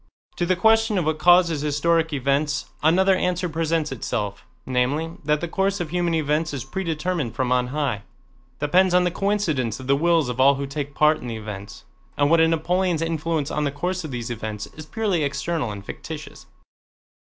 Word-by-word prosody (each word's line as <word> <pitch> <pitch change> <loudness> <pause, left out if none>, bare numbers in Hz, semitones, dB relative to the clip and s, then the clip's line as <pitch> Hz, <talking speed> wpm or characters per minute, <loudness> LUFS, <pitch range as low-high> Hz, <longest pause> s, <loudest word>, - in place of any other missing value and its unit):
To 175 - 0
the 185 - +3
question 220 +2 +3
of 175 - 0
what 155 0 0
causes 175 -4 +5
historic 160 +3 +1
events 140 +2 0 0.2
another 190 +5 +4
answer 180 0 0
presents 160 -2 -1
itself, 105 -5 -3 0.2
namely, 135 +6 0
that 150 +1 +1
the 175 - -2
course 195 +3 0
of 170 -3 -4
human 175 -1 0
events 155 0 0
is 130 - -4
predetermined 165 - -2
from 125 -1 -1
on 125 -1 +2
high—depends 140 - -1
on 180 - +5
the 180 - +1
coincidence 165 - -1
of 130 - -8
the 140 +1 +3
wills 165 -1 +2
of 125 0 -4
all 140 +2 +6
who 140 +1 -3
take 140 0 -5
part 155 0 +4
in 125 - -7
the 115 -1 -4
events, 105 -2 -8 0.3
and 145 +1 +3
that 165 - +5
a 160 - +5
Napoleon's 170 +1 +1
influence 160 -2 -1
on 150 - -1
the 145 - +1
course 180 +5 -3
of 155 - -6
these 120 -2 -4
events 110 -2 -5
is 155 0 -10
purely 200 -5 0
external 145 -1 -2
and 100 -1 -7
fictitious. - - -8
155 Hz, 190 wpm, -23 LUFS, 135-175 Hz, 0.3 s, all